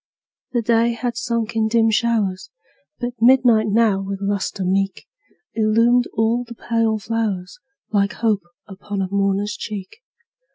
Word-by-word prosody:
The 240 -2 +1
day 230 +1 +2
had 240 +1 -3
sunk 235 -1 -2
in 220 -1 +2
dim 225 0 +3
showers, 215 -5 0 0.5
But 245 -1 -3
midnight 240 -3 +5
now, 210 -2 +2
with 195 0 -4
lustre 200 -1 -2
meet. 195 +1 -1 0.5
Illumined 230 +3 +3
all 225 +3 +1
the 235 0 -11
pale 230 -1 0
flowers, 210 -4 -3 0.3
Like 200 -1 +1
hope 220 -3 0 0.3
upon 200 0 -5
a 185 - -4
mourner's 200 +1 0
cheek. 205 - -7
220 Hz, 135 wpm, -21 LUFS, 200-235 Hz, 0.5 s, midnight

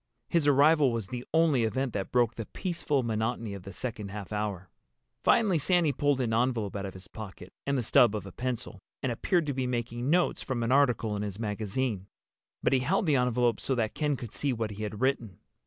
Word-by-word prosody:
His 165 -4 +2
arrival 145 0 +5
was 115 -3 -2
the 125 -1 -5
only 160 -6 +3
event 130 +3 -1
that 100 -2 -3
broke 120 -2 +3
the 115 -3 -6
peaceful 165 -7 -1
monotony 115 -1 -2
of 100 - -7
the 100 - -9
second 110 -4 -5
half 105 0 -7
hour. 105 -4 -3 0.6
Finally 200 -8 +4
Sandy 170 0 +3
pulled 145 0 +1
an 115 -3 0
envelope 115 -4 0
out 100 -1 -3
of 95 - -9
his 95 +1 -10
pocket, 95 -4 -10
and 140 0 +1
the 125 - 0
stub 110 0 +5
of 105 - -4
a 95 - -8
pencil, 125 -2 -4 0.2
and 130 - 0
appeared 170 +8 +1
to 145 - -1
be 130 -1 -1
making 120 +1 -2
notes 175 +2 +2
from 125 -3 -2
an 115 - 0
article 120 -6 +3
in 100 - -3
his 100 -2 -4
magazine. 105 -1 -2 0.6
But - - +3
he 130 - +4
held 185 +10 +1
the 150 -4 +3
envelope 125 -2 +2
so 135 - -1
that 115 -3 -1
Ken 150 -2 0
could 120 -5 -8
see 145 - 0
what 110 -3 -2
he 105 +1 -7
had 105 +1 -4
written. 120 -7 0
120 Hz, 220 wpm, -29 LUFS, 105-140 Hz, 0.6 s, arrival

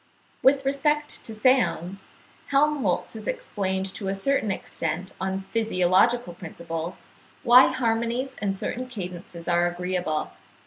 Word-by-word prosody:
With 270 0 +4
respect 295 +2 0
to 220 - -6
sounds, 210 -6 +1 0.4
Helmholtz 290 +1 +1
has - - -8
explained 200 - -2
to 200 - -5
a 195 - 0
certain 225 +2 +1
extent 175 -1 -3
on 190 0 -1
physiological 220 0 +2
principles, 170 0 -6 0.4
why 250 +2 +8
harmonies 240 +1 -1
and 195 -2 -1
certain 255 +6 -3
cadences 180 -6 -7
are 175 0 +3
agreeable. 175 -3 -2
200 Hz, 120 wpm, -25 LUFS, 180-255 Hz, 0.4 s, why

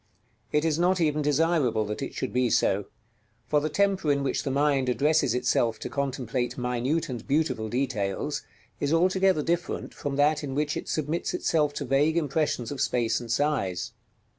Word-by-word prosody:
It 150 +1 +2
is 160 0 +1
not 180 +1 +3
even 150 -2 +1
desirable 145 -7 +2
that 105 +4 -4
it - - -5
should 130 - -3
be 125 -1 +2
so; 100 -2 +2 0.6
for 150 - +3
the 155 +2 -2
temper 190 -3 +1
in 140 -1 +1
which 135 - 0
the - - -3
mind 140 -1 +2
addresses 140 -1 +2
itself 120 -2 +1
to - - -6
contemplate 130 -3 -2
minute 125 +6 -1
and 120 -5 -6
beautiful 140 -7 0
details 120 -6 -2 0.4
is 145 - -1
altogether 185 0 +3
different 170 +2 -2
from 145 -1 -4
that 150 +2 +2
in 135 -2 -4
which 150 +1 0
it - - -5
submits 155 +2 -1
itself 150 -3 +1
to 145 - -3
vague 145 +5 +2
impressions 150 -6 0
of 140 - -4
space 115 -3 +1
and 120 -2 -7
size. 120 -10 0
145 Hz, 175 wpm, -27 LUFS, 125-155 Hz, 0.6 s, not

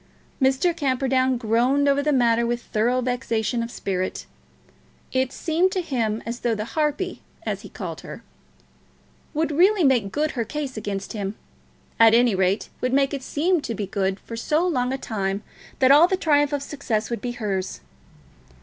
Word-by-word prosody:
Mr. 270 +6 +3
Camperdown 260 -3 +1
groaned 245 +5 +2
over 280 0 +3
the 300 +1 +1
matter 235 -3 +3
with 240 0 0
thorough 240 +4 +1
vexation 245 -2 -1
of 230 - -3
spirit. 185 -5 -3 0.9
It 260 0 0
seemed 345 +5 +1
to 370 - 0
him 230 -9 -2
as 235 +1 -4
though 235 -2 0
the 215 0 -3
harpy, 310 - -2 0.2
as - - -2
he - - -11
called - - -6
her, - - -9 1.1
would 315 0 0
really 370 +5 +4
make 245 -8 +3
good 305 +1 0
her 240 - -2
case 280 +3 -5
against 205 -2 -4
him, 200 -1 -4 0.6
at 225 0 +7
any 240 -1 +4
rate, 190 +1 +1
would 255 0 0
make 275 +1 +2
it 275 - -3
seem 325 +6 +1
to 230 - -4
be 205 - -3
good 190 0 -1
for 230 - -8
so 305 +9 +1
long 250 -7 0
a 265 - -1
time 200 -5 -3 0.3
that 260 0 +5
all 300 +5 +8
the 375 - 0
triumph 290 -5 +2
of 285 -1 -2
success 240 -7 -3
would 235 - -3
be 245 -1 -3
hers. 195 -5 -3
255 Hz, 175 wpm, -24 LUFS, 225-290 Hz, 1.1 s, all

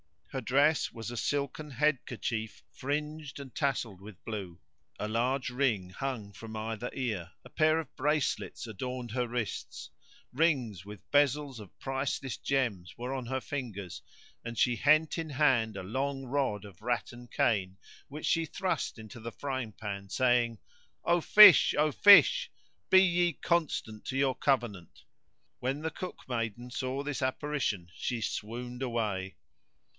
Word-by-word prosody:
[FN#106] - - -31
Her - - -2
dress 140 +6 +3
was 115 0 -6
a 120 - -6
silken 145 +3 -2
head 145 +1 +1
kerchief 110 -2 -4
fringed 150 +2 -4
and 140 -3 -9
tasseled 120 -9 -1
with 100 -2 -12
blue: 95 -6 -6 0.4
a 105 - -3
large 125 +4 0
ring 120 -8 0
hung 120 -3 -4
from 110 +2 -9
either 110 +2 -4
ear; 105 -9 -3
a - - -13
pair 155 0 +3
of 155 -5 -7
bracelets 150 -4 0
adorned 120 +2 -5
her 125 +1 -1
wrists; 120 -3 -4 0.4
rings 125 - +1
with 105 -2 -10
bezels 145 -2 +2
of 105 -4 -13
priceless 135 -1 -2
gems 115 - -1
were 125 +2 -4
on 130 -2 -4
her 130 +2 -2
fingers; 100 -11 -5 0.4
and 115 0 -6
she 120 -1 +3
hent 155 +5 +4
in 165 -2 -4
hand 130 -7 +2
a 95 - -5
long 135 +7 -2
rod 130 -6 -1
of 100 -2 -13
rattan 120 +1 -3
cane 95 -6 0 0.3
which 150 +2 -7
she 165 -1 +2
thrust 185 -3 -2
into 110 +1 -10
the 115 0 -7
frying 130 -6 -4
pan, 100 -2 -6
saying, 120 0 +2 0.5
"O 175 +1 +3
fish! 205 +2 +9
O 150 +1 +3
fish! 475 - +7 0.4
be 190 - +8
ye 175 -1 +2
constant 150 -10 -1
to 135 - -3
your 135 -1 +3
covenant?" 120 - -1 0.6
When 135 +4 -2
the 160 0 -2
cookmaiden 120 - -5
saw 130 +2 -2
this 145 -1 -3
apparition 130 -9 -1
she 120 -2 -3
swooned 120 +4 -4
away. 105 -7 -2
125 Hz, 150 wpm, -30 LUFS, 110-145 Hz, 0.6 s, fish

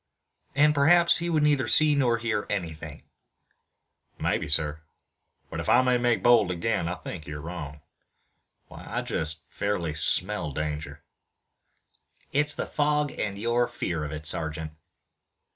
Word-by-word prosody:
"And 150 +1 +5
perhaps 170 +4 +5
he 170 +1 -2
would 155 -3 +2
neither 145 -3 +2
see 155 -1 +5
nor 125 -5 +2
hear 115 -3 -2
anything" 80 -6 -5 1.2
"Maybe, - - -1
sir, 75 +1 +1 0.7
but - - -4
if - - -3
I 130 - +5
may 125 -1 +2
make 120 -1 +1
bold 120 -6 +5
again, 90 +1 -1
I 90 - -2
think 80 -4 -8
you're 75 0 -6
wrong. 75 -2 -7 0.9
Why, - - -12
I - - -2
just 75 -1 -3
fairly 100 -6 -2
smell 90 +1 0
danger." 75 +1 -4 1.3
"It's 150 +1 +2
the - - -3
fog 150 -1 0
and 100 -1 -4
your 120 +3 +1
fear 80 -3 -3
of 75 - -5
it, 75 0 -7
sergeant." 80 0 -2
100 Hz, 145 wpm, -26 LUFS, -, 1.3 s, And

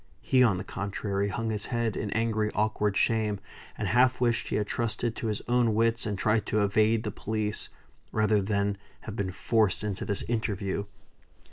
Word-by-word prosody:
He, 130 -1 +3
on 110 -7 +5
the 90 - -4
contrary, 100 0 -2
hung 110 +2 -2
his 105 -1 -3
head 115 -3 -1
in 105 - -2
angry, 110 -1 +1
awkward 105 -1 +1
shame; 110 -3 +1 0.4
and 105 - -2
half 125 +5 +4
wished 120 -2 +1
he - - -2
had 105 - +1
trusted 115 +1 -2
to 115 - -3
his 105 -2 -2
own 120 -3 +3
wits, 115 +1 +2
and 100 -2 -2
tried 105 +1 +1
to 110 - +1
evade 110 +2 +3
the 105 - -2
police, 105 0 -2 0.4
rather 105 -1 +3
than 100 0 0 0.2
have 105 - -7
been 100 -3 -2
forced 105 +1 +1
into 105 -3 -2
this 100 -2 -1
interview. 100 -4 -2
110 Hz, 180 wpm, -28 LUFS, 100-115 Hz, 0.4 s, on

